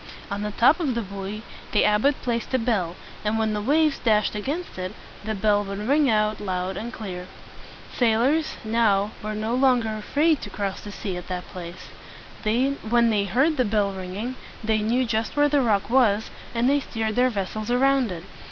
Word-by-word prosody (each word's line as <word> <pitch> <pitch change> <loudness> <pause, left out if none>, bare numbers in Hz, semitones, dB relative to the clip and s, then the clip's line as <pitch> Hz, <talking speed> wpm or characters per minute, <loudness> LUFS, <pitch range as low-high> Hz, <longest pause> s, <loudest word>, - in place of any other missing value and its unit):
On 200 0 -2
the 210 - -2
top 240 - +4
of 285 -8 0
the 235 - -1
buoy 200 +2 -6 0.3
the 210 - +4
abbot 210 +7 +3
placed 235 -2 -2
a - - +5
bell; 210 -8 0 0.3
and 215 +1 0
when 220 -1 +1
the 210 - -1
waves 300 +5 +2
dashed 215 -3 +2
against 275 - -4
it, 185 0 -4 0.3
the 220 +1 -2
bell 205 0 +2
would 195 0 -5
ring 285 0 +4
out 215 -1 +1
loud 185 -1 -2
and 235 +4 -5
clear. 185 -6 -6 0.7
Sailors, 250 +7 +2
now, 215 -2 +2
were 215 0 -3
no 215 +2 -2
longer 250 -3 +3
afraid 285 +9 +1
to - - -6
cross 200 -2 -3
the 205 - -8
sea 195 -2 -4
at 180 - -8
that 180 -1 -4
place. 175 -1 -9 0.5
When 235 0 +2
they 205 -2 +1
heard 270 - +2
the 255 - +4
bell 205 -2 +1
ringing, 195 +7 -5 0.3
they 220 0 +2
knew 235 +4 +1
just 225 +4 -2
where 290 0 +4
the 290 -1 +3
rock 210 -5 +1
was, 225 -4 +3 0.2
and 235 +2 +2
they 285 +2 +4
steered 220 -5 -3
their 250 +1 +4
vessels 215 0 -3
around 260 -2 +3
it. 170 -2 -6
220 Hz, 190 wpm, -24 LUFS, 205-250 Hz, 0.7 s, a